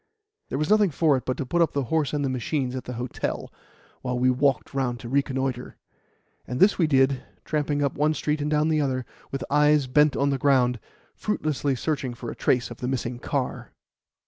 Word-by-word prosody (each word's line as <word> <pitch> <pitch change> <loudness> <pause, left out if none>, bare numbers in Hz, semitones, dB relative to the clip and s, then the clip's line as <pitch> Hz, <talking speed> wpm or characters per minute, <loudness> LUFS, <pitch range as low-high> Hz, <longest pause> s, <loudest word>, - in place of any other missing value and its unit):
There - - -2
was 155 +4 -1
nothing 210 -2 +5
for 155 -1 +3
it 130 - -3
but 130 - -1
to 140 - -3
put 170 +7 +1
up 165 - +2
the 140 - 0
horse 155 -3 +2
and 145 -1 -1
the - - 0
machines 130 +1 -2
at 130 - -5
the 125 - -5
hotel, 125 0 -4 0.5
while 125 -1 -2
we 130 +1 +3
walked 135 +2 +1
round 125 -3 -1
to 120 - -7
reconnoitre; 130 -2 -1 0.7
and 125 - -3
this 195 +1 +5
we 165 - +4
did, 135 -2 +3 0.2
tramping 145 -1 0
up 140 - 0
one 155 +1 +1
street 150 +1 -1
and 145 - -1
down 155 +1 +2
another, 135 -5 0 0.3
with 135 -1 -3
eyes 150 0 +4
bent 150 +3 +3
on 140 0 +2
the 135 - -1
ground, 125 -4 +3 0.3
fruitlessly 150 -8 -1
searching 135 -3 -2
for 120 0 -6
a - - -8
trace 125 -1 +1
of 120 - -8
the 125 - -4
missing 125 -2 -2
car. 135 0 -3
135 Hz, 205 wpm, -25 LUFS, 125-150 Hz, 0.7 s, nothing